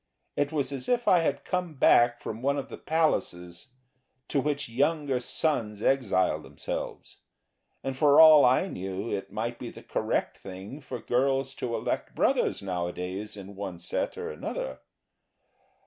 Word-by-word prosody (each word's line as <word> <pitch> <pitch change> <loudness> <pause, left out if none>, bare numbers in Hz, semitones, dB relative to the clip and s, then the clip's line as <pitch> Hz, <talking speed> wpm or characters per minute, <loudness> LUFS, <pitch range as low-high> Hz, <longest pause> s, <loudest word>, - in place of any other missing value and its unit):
It 145 +1 0
was 145 -3 -1
as 135 -2 -5
if 245 -1 +1
I 180 - +6
had 140 -4 -1
come 180 -3 -2
back 120 -2 +5
from 110 +1 -6
one 140 +2 +1
of 140 - -4
the - - -8
places 90 - -1 0.6
to 140 - +1
which 145 0 -1
younger 140 +2 +1
sons 120 -5 -1
exile 95 - +2
themselves, 75 -2 -6 0.7
and 135 0 -3
for 145 +1 +5
all 155 -2 +9
I 130 +9 +4
knew 95 - -5
it 95 - -4
might 120 +2 -3
be - - -5
the - - -12
correct - - -1
thing 95 +8 -8
for 140 - -6
girls 135 +1 0
to 115 -2 -2
elect - - -3
brothers - - +1
nowadays 90 +3 -4
in 100 0 -9
one 95 -3 -5
set 85 - -3
or 455 0 -4
another. - - -5
130 Hz, 155 wpm, -28 LUFS, 100-145 Hz, 0.7 s, all